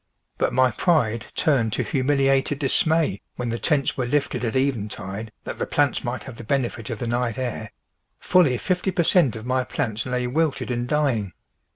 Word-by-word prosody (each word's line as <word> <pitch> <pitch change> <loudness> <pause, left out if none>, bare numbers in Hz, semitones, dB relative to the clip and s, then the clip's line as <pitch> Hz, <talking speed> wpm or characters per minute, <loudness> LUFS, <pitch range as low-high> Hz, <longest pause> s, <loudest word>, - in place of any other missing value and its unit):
But - - +2
my 130 0 +3
pride 120 - +1
turned 120 -8 +2
to - - 0
humiliated 135 0 +2
dismay 155 - +1
when 120 -1 -3
the 115 +1 -2
tents 150 -4 +1
were 125 -2 -1
lifted 145 0 0
at 115 0 -1
eventide 110 -5 -2
that - - -6
the - - -1
plants - - +1
might - - -3
have - - -10
the - - -8
benefit 120 -3 -1
of 115 - -3
the 120 - -4
night 120 -1 -1
air; 120 -4 -4 0.5
fully 165 -9 +4
fifty 185 +7 -1
per 175 -2 +1
cent 160 - +3
of 110 0 -7
my 130 +1 +1
plants 110 -1 -3
lay 125 0 -1
wilted 145 +1 0
and 120 0 -2
dying. 130 - 0
125 Hz, 185 wpm, -24 LUFS, 115-145 Hz, 0.5 s, fully